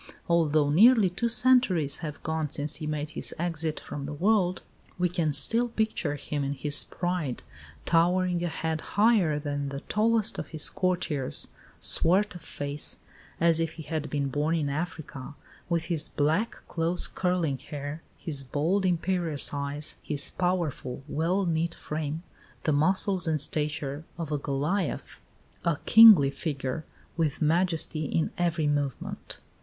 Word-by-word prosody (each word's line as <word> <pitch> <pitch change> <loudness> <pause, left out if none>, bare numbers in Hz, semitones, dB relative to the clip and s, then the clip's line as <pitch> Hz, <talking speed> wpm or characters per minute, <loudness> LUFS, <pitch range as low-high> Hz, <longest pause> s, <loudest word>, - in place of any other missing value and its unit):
Although 155 -3 +2
nearly 215 - +6
two 235 +6 -1
centuries 225 - +3
have 150 -3 -7
gone 160 -1 -2
since 145 0 -3
he 155 -1 -5
made 150 0 -3
his - - -2
exit 165 -2 -2
from 140 -1 -7
the 145 +1 -5
world, 185 +1 +1 0.3
we 180 0 +2
can 170 -3 -1
still 225 - +3
picture 220 -10 -1
him 145 0 -4
in 140 +1 -2
his 145 +2 +2
pride, 175 -8 -3 0.4
towering 175 +1 +2
a - - 0
head 160 -1 -3
higher 205 -8 +2
than 145 -1 -3
the 140 0 -6
tallest 220 0 +1
of - - -5
his 155 -2 -2
courtiers, 175 -7 -1 0.3
swart 190 +4 +3
of 175 - -10
face, 145 0 -3 0.4
"as 165 -1 +4
if 165 -1 -1
he 160 - -9
had 155 0 -4
been 140 -2 -1
born 150 +4 0
in 150 -3 -1
Africa," 150 -2 -5 0.3
with 170 -2 0
his 165 -3 +1
black, 160 +10 -1
close 170 +2 +2
curling 175 -7 -1
hair, 145 +2 -7 0.2
his 145 -4 -2
bold, 165 +9 0
imperious 170 -4 +1
eyes, 145 +1 -3
his 145 -2 -1
powerful, 170 -8 -2
well 175 +6 0
knit 165 0 -1
frame 155 +1 -4 0.4
"the 155 - +1
muscles 185 +4 +3
and 155 -1 +1
stature 150 0 0
of 165 -3 -5
a 150 - 0
Goliath" 150 +6 -2 0.4
a 170 -3 +1
kingly 210 -12 +8
figure, 140 0 -4 0.3
with 155 -4 0
majesty 160 -1 +1
in 160 +3 -1
every 170 -2 0
movement. 145 -3 -3
160 Hz, 150 wpm, -27 LUFS, 145-180 Hz, 0.4 s, kingly